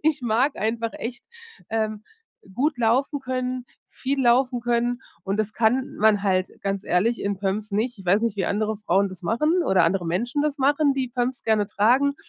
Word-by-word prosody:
ich 305 -1 +2
mag 245 +4 +1
einfach 225 +2 -1
echt, 240 +1 -6 0.4
ähm, 215 -1 -1 0.5
gut 280 +3 0
laufen 260 +5 +1
können, 255 -1 -3 0.2
viel 270 +1 -2
laufen 245 +1 +3
können, 240 +1 0 0.2
und 195 +1 -1
das 215 0 -1
kann 245 +4 +1
man 210 -1 +3
halt 185 -2 +1
ganz 195 -1 -2
ehrlich 215 +7 +1
in 200 -1 -2
Pumps 205 +2 -2
nicht. 220 +3 -1
Ich 195 - -11
weiß 190 +4 +3
nicht, 225 -3 -1
wie 190 - -1
andere 215 +1 -1
Frauen 200 -1 +1
das 185 0 -11
machen 305 - +1
oder 185 - +3
andere 175 +1 0
Menschen 240 - -1
das 300 -1 -1
machen, 285 +2 +3
die 265 -2 -1
Pumps 245 +1 -2
gerne 215 -2 +2
tragen. 245 +8 +2
230 Hz, 185 wpm, -24 LUFS, 205-255 Hz, 0.5 s, laufen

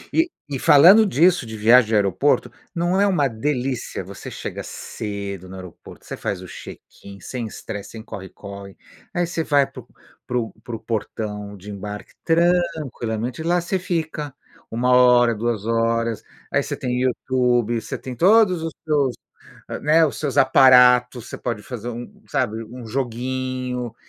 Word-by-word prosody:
E 330 +2 +3 0.2
e 135 - -3
falando 175 - +7
disso, 175 -1 +3
de 110 -1 -7
viagem 115 +2 +6
de 110 - 0
aeroporto, 100 +7 +2 0.2
não 175 +3 +1
é 205 - +4
uma 165 -8 +2
delícia, 125 +1 -3
você - - -9
chega - - -6
cedo 100 -3 -6
no 95 - -9
aeroporto, 90 -2 -12
você - - -6
faz 100 - -3
o - - -9
check-in, 100 +2 -12
sem 120 -3 -5
estresse, 100 -1 -8
sem 110 -1 -9
corre-corre. 100 -1 -10 0.4
Aí 175 - +1
você 165 -1 -2
vai 145 -3 +3
pro - - -12 0.4
pro 120 -2 -2
pro 115 -2 -6
portão 105 -2 -4
de 100 +2 -10
embarque 105 +1 -7
tranquilamente, 160 -8 0
lá 175 +2 +2
você 180 +2 -2
fica 160 -5 -3 0.4
1 125 +2 0
hora, 125 -1 +6
2 110 -1 -2
horas. 115 -1 0 0.3
Aí - - +2
você - - -4
tem 125 0 -2
YouTube, 125 -2 +1
você - - -5
tem 130 -1 -7
todos 185 - +4
os 165 0 -3
seus, 145 -5 +1 0.7
né, 160 +2 +5
os - - -5
seus 145 -2 -2
aparatos, 125 -2 +6
você - - -6
pode 115 -4 -4
fazer 120 -2 -7
um 120 - -9
sabe, 115 -5 -1
um 120 +2 -10
joguinho. 125 0 -3
125 Hz, 155 wpm, -22 LUFS, 110-145 Hz, 0.7 s, falando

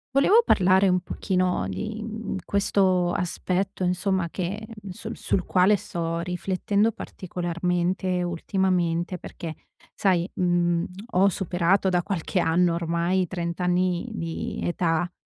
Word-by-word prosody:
Volevo 405 +12 +6
parlare 190 +1 +4
un 180 0 +3
pochino 180 - -1
di, 210 - -4
mhmm, 220 -1 -5
questo 185 -3 +2
aspetto 185 +2 -1
insomma 180 0 0
che, 195 +5 -4
mhmm, 210 -3 -10
su 180 - -7
sul 185 - -1
quale 185 +4 +4
sto 165 -3 -3
riflettendo 190 +5 0
particolarmente 180 0 -2
ultimamente 175 0 0
perché, 165 -1 -7 0.4
sai, 185 -2 +2
mhmm, 175 -1 +2 0.3
ho 190 +2 +5
superato 185 +1 +1
da 175 -1 +1
qualche 185 -1 -1
anno, 170 +1 +3
ormai, 170 +2 0
i 180 - -1
30 170 -1 -4
anni 180 +2 +1
di 165 -5 -4
età, 175 0 0
180 Hz, 125 wpm, -25 LUFS, 175-190 Hz, 0.4 s, Volevo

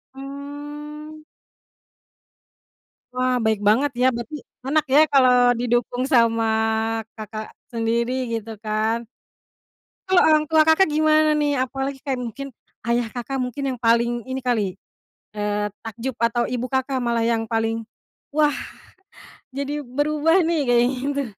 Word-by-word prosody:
Mmm. 295 +2 -8 1.9
Wah, 255 0 +1
baik 220 -2 +2
banget, 260 +7 +3
ya. - - +4
Berarti 235 +5 -6 0.3
enak 300 +3 +1
ya 290 - +7
kalau 255 -2 +6 0.3
didukung 245 +1 0
sama 230 -2 +4 0.7
kakak 215 0 -6 0.3
sendiri 235 +1 0 0.2
gitu, 225 -1 -4
kan. 220 +2 -1 1.0
Kalau 375 -1 +5
orang 310 -1 +4
tua 315 0 +4
Kakak 320 +4 +5
gimana, 310 0 +3
nih? 295 -1 +1
Apalagi 270 +2 -2
kayak 265 -3 -2
mungkin 250 +4 -6 0.4
ayah 235 0 0
Kakak 255 +3 -4
mungkin 260 +2 -3
yang 250 - -9
paling 235 +1 +2
ini 260 - -2
kali, 220 -7 -1 0.6
eee, 210 0 -1 0.2
takjub 230 +3 -5
atau 235 +1 +1
ibu 250 0 -2
Kakak 265 0 0
malah 235 -1 +1
yang 230 -1 +1
paling, 225 0 -1 0.5
"Wah, 295 -1 +2 1.0
jadi 280 +2 -3
berubah, 300 +7 +2
nih." 330 -2 +1
kayak 240 -1 +4
gitu? 275 +2 -2
255 Hz, 125 wpm, -22 LUFS, 230-290 Hz, 1.9 s, ya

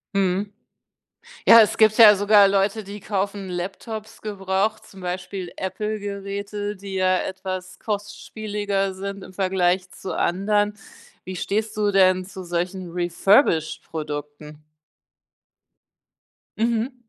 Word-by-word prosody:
Mhm. 195 +1 0 0.9
Ja, 230 0 +10
es 210 - +2
gibt 215 -1 +5
ja 210 -2 +10
sogar 205 0 +6
Leute, 200 +2 +1
die 200 +1 -8
kaufen 195 -1 -3
Laptops 205 +5 -6
gebraucht, 200 +1 -1
zum 195 - -14
Beispiel 180 0 -5
Apple-Geräte, 205 0 -4
die 195 0 -8
ja 185 -1 +2
etwas 185 -1 -5
kostspieliger 205 -1 -3
sind 200 0 -6
im - - -11
Vergleich 185 -1 +1
zu - - -7
anderen. 205 +3 +1 0.5
Wie 185 0 -7
stehst 215 +4 -2
du 205 -1 +2
denn 185 -1 +4
zu 190 0 -9
solchen 175 +1 -3
Refurbished-Produkten? 155 - 0 1.9
Mhm. 230 +3 0
195 Hz, 110 wpm, -23 LUFS, 185-205 Hz, 1.9 s, Ja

